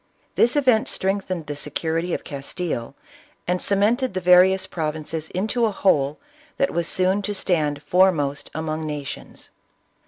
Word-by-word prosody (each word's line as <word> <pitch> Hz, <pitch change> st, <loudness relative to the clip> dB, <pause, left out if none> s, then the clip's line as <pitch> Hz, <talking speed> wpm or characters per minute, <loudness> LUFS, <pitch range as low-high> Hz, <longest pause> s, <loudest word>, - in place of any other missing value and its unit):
This 240 Hz, +4 st, +3 dB
event 255 Hz, -6 st, +3 dB
strengthened 190 Hz, -3 st, -2 dB
the 145 Hz, -, -5 dB
security 160 Hz, +4 st, -2 dB
of -, -, -2 dB
Castile, 140 Hz, -2 st, -4 dB, 0.5 s
and 180 Hz, +1 st, 0 dB
cemented 210 Hz, +4 st, +1 dB
the -, -, +1 dB
various 185 Hz, +1 st, +5 dB
provinces 155 Hz, -1 st, -4 dB
into 220 Hz, +5 st, 0 dB
a -, -, -1 dB
\vhole 150 Hz, -8 st, +1 dB, 0.4 s
that 275 Hz, -, +1 dB
was 170 Hz, -1 st, -1 dB
soon 185 Hz, +2 st, +1 dB
to 205 Hz, +1 st, -3 dB
stand 150 Hz, -6 st, 0 dB
foremost 160 Hz, -6 st, +2 dB
among 160 Hz, 0 st, -3 dB
nations. 145 Hz, -2 st, -7 dB
180 Hz, 135 wpm, -23 LUFS, 150-195 Hz, 0.5 s, various